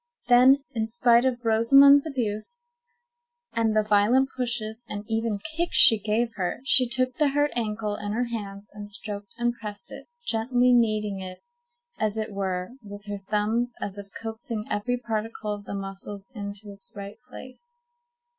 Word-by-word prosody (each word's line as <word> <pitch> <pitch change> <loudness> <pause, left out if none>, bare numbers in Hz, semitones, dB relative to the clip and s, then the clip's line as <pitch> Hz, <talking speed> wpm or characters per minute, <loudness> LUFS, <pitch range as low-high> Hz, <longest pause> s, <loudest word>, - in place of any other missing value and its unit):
Then, 260 +3 +6
in 220 -2 -1
spite 240 +1 +3
of 245 -2 -1
Rosamond's 275 +6 +6
abuse, 255 - -4 0.9
and 225 -1 +1
the 215 - +3
violent 215 +6 +3
pushes 240 -3 -3
and 205 0 -5
even 225 -1 -1 0.2
kicks 345 +1 0
she 225 - +9
gave 220 +3 -1
her, 180 -2 -2
she 255 -2 +6
took 255 0 0
the 300 - +3
hurt 290 +1 +1
ankle 215 -2 -2
in 205 -1 -5
her 240 +3 0
hands, 205 -4 -6
and 205 0 -9
stroked 205 0 -8
and 240 0 0
pressed 210 -2 -7
it, - - -10 0.2
gently 245 +2 +2
kneading 215 -4 +1
it, 185 -1 -9 0.6
as 215 0 0
it 220 -1 -3
were, 190 0 -3
with 205 -1 -11
her 205 -1 -6
thumbs, 225 +3 0
as 205 0 -5
if 200 - -9
coaxing 225 -1 -5
every 245 +4 -1
particle 220 -2 -4
of 205 0 -9
the 200 - -6
muscles 195 +2 -7
into 205 -1 -7
its 200 +4 -9
right 200 +1 -8
place. 480 - -11
220 Hz, 165 wpm, -25 LUFS, 205-245 Hz, 0.9 s, she